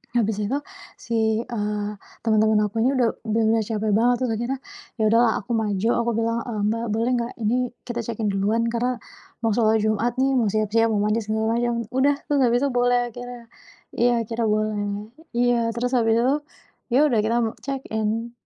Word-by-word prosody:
habis 220 -3 +1
itu 260 - -1 0.5
si, 235 - -2 0.3
eee, 210 -3 -3 0.3
temen-temen 220 -1 +3
aku 210 +2 -2
ini 260 +4 +2
udah 245 -2 +3 0.2
udah 220 +1 +1
enggak 225 -2 +1
capek 215 -1 -1
banget 235 +4 +4
terus 240 - 0
akhirnya, 245 +4 -3 0.4
ya 220 - -1
udahlah 230 0 +4
aku 240 - -8
maju, 220 -1 0
aku 235 0 0
bilang, 230 0 0
"Eee, 220 -3 -3
Mbak 230 +1 -2
boleh 230 +3 +1
nggak 235 +1 -4
ini 220 +3 +2 0.3
kita 240 -1 -4
check-in 220 -2 -2
duluan, 205 +4 +1
karena 245 +2 0 0.5
mau 225 - +2
sholat 220 -1 +2
Jumat 215 +3 0
nih, 265 +1 +2
mau 225 - +2
siap-siap, 215 +2 +2
mau 210 -2 +1
mandi 215 +2 +1
segala 220 +1 -1
macem," 240 -1 0
udah, 275 +3 +3 0.2
terus 285 - +3
habis 240 +1 +3
itu 280 - +2
boleh 245 0 +3
akhirnya. 245 0 -8 0.6
Iya 245 +1 +4
akhirnya 230 +1 -2
boleh. 215 -1 -1 0.6
Iya, 245 0 +3 0.2
terus 245 +1 -1
habis 225 -1 +3
itu, 255 +3 +3 0.6
ya - - +6
udah 240 -6 +2
kita 230 +2 +1
me 220 - -1
check-in. 230 -4 -2
230 Hz, 185 wpm, -23 LUFS, 215-240 Hz, 0.6 s, ya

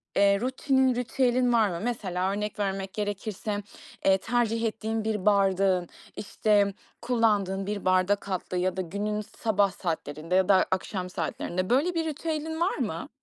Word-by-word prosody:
eee, 200 0 +4
rutinin, 260 +1 +2
ritüelin 250 0 +1
var 220 -3 +4
mı? 170 -2 -4
Mesela 190 -6 -1
örnek 210 +1 -3
vermek 195 -1 -2
gerekirse, 205 0 -3 0.4
eee, 190 0 +5
tercih 230 +1 0
ettiğin 220 0 -2
bir 215 -3 -2
bardağın, 195 -3 +3 0.3
işte, 205 -1 +1 0.3
kullandığın 210 -5 +1
bir 205 -1 -3
bardak 185 +2 +2
altlığı 185 -1 -3
ya 185 +1 0
da 185 - +1
günün 205 +4 -2
sabah 205 -2 0
saatlerinde 165 -2 -3
ya 190 +1 +3
da 190 -2 +5
akşam 185 0 -2
saatlerinde, 180 +1 -3
böyle, 290 +9 +2
bir 325 -1 0
ritüelin 320 +1 -3
var 355 - +1
mı? - - -3
205 Hz, 150 wpm, -27 LUFS, 190-230 Hz, 0.4 s, eee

